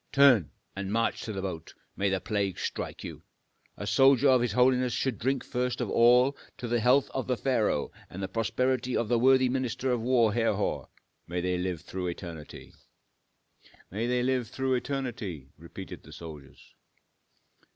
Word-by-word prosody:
turn! 135 Hz, -, +5 dB, 0.3 s
and 100 Hz, 0 st, -4 dB
march 115 Hz, +1 st, 0 dB
to 110 Hz, -, -5 dB
the 95 Hz, -2 st, -4 dB
boat, 85 Hz, -4 st, -6 dB, 0.2 s
may 100 Hz, 0 st, +1 dB
the 95 Hz, 0 st, 0 dB
plague 100 Hz, -3 st, -2 dB
strike -, -, -4 dB
you! -, -, -8 dB, 0.6 s
A 100 Hz, -, -5 dB
soldier 135 Hz, +5 st, +5 dB
of 130 Hz, -2 st, +5 dB
his 120 Hz, -4 st, 0 dB
holiness 125 Hz, 0 st, +3 dB
should 130 Hz, -2 st, -1 dB
drink 130 Hz, +2 st, 0 dB
first 125 Hz, 0 st, -2 dB
of -, -, -2 dB
all 125 Hz, +4 st, +5 dB, 0.2 s
to 125 Hz, -, -5 dB
the 120 Hz, 0 st, +1 dB
health 125 Hz, +4 st, +3 dB
of 130 Hz, -, -3 dB
the 125 Hz, -1 st, 0 dB
pharaoh 115 Hz, -, 0 dB, 0.2 s
and 95 Hz, +2 st, -7 dB
the -, -, -1 dB
prosperity 125 Hz, +4 st, 0 dB
of 115 Hz, -, -1 dB
the 120 Hz, -1 st, +3 dB
worthy 130 Hz, +1 st, +5 dB
minister 130 Hz, 0 st, -1 dB
of 120 Hz, -2 st, 0 dB
war, 120 Hz, -3 st, +3 dB
Herhor, 115 Hz, 0 st, 0 dB, 0.4 s
may 90 Hz, +1 st, -2 dB
they 90 Hz, 0 st, -1 dB
live 90 Hz, -3 st, -2 dB
through 90 Hz, -1 st, -5 dB
eternity!" 85 Hz, -3 st, -8 dB, 1.2 s
"May 110 Hz, +5 st, -2 dB
they 125 Hz, 0 st, +1 dB
live 130 Hz, -2 st, 0 dB
through 130 Hz, +2 st, -1 dB
eternity!" 120 Hz, -, -3 dB
repeated 90 Hz, +3 st, -10 dB
the 80 Hz, -, -15 dB
soldiers. 75 Hz, -4 st, -11 dB
115 Hz, 170 wpm, -28 LUFS, 95-130 Hz, 1.2 s, turn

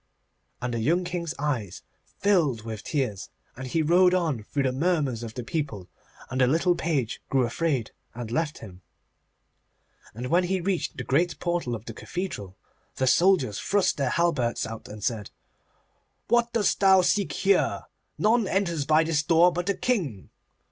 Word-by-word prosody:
And 125 Hz, -1 st, -2 dB
the 115 Hz, -, -1 dB
young 170 Hz, +11 st, +2 dB
King's 170 Hz, -2 st, -4 dB
eyes 125 Hz, -11 st, -3 dB, 0.3 s
filled 160 Hz, -, +2 dB
with 110 Hz, -2 st, -6 dB
tears, 130 Hz, -, -2 dB, 0.3 s
and 130 Hz, +1 st, -7 dB
he 160 Hz, +5 st, 0 dB
rode 180 Hz, +3 st, +5 dB
on 160 Hz, -10 st, 0 dB
through 140 Hz, +6 st, -2 dB
the 130 Hz, -, +1 dB
murmurs 145 Hz, -4 st, 0 dB
of 115 Hz, -2 st, -7 dB
the 125 Hz, -, -4 dB
people, 115 Hz, -, -4 dB, 0.4 s
and 130 Hz, +1 st, 0 dB
the 125 Hz, -, +5 dB
little 165 Hz, +6 st, +3 dB
page 150 Hz, -9 st, -2 dB
grew 130 Hz, -2 st, +2 dB
afraid 130 Hz, -2 st, -1 dB, 0.2 s
and 120 Hz, -2 st, -6 dB
left 155 Hz, +3 st, -1 dB
him. 95 Hz, -4 st, -12 dB, 1.3 s
And 120 Hz, +3 st, -5 dB
when 180 Hz, +2 st, +4 dB
he 190 Hz, +1 st, 0 dB
reached 180 Hz, 0 st, -2 dB
the -, -, -4 dB
great 165 Hz, +4 st, +1 dB
portal 175 Hz, -9 st, -1 dB
of 110 Hz, 0 st, -9 dB
the -, -, -7 dB
cathedral, 105 Hz, -, -6 dB, 0.4 s
the 130 Hz, -, 0 dB
soldiers 135 Hz, -, +3 dB
thrust 200 Hz, -1 st, +1 dB
their 135 Hz, -3 st, 0 dB
halberts 145 Hz, -9 st, 0 dB
out 110 Hz, 0 st, -8 dB
and 105 Hz, -1 st, -9 dB
said, 110 Hz, -4 st, -2 dB, 1.0 s
'What 240 Hz, 0 st, +3 dB
dost 225 Hz, -3 st, +1 dB
thou 190 Hz, -1 st, +6 dB
seek 200 Hz, +2 st, +1 dB
here? 195 Hz, 0 st, +1 dB, 0.3 s
None 220 Hz, 0 st, +2 dB
enters 170 Hz, -7 st, 0 dB
by 155 Hz, +1 st, +5 dB
this 160 Hz, -2 st, +1 dB
door 170 Hz, +3 st, +4 dB
but 175 Hz, +2 st, -3 dB
the 200 Hz, -, +1 dB
King. 165 Hz, -, -2 dB
155 Hz, 170 wpm, -26 LUFS, 120-180 Hz, 1.3 s, thou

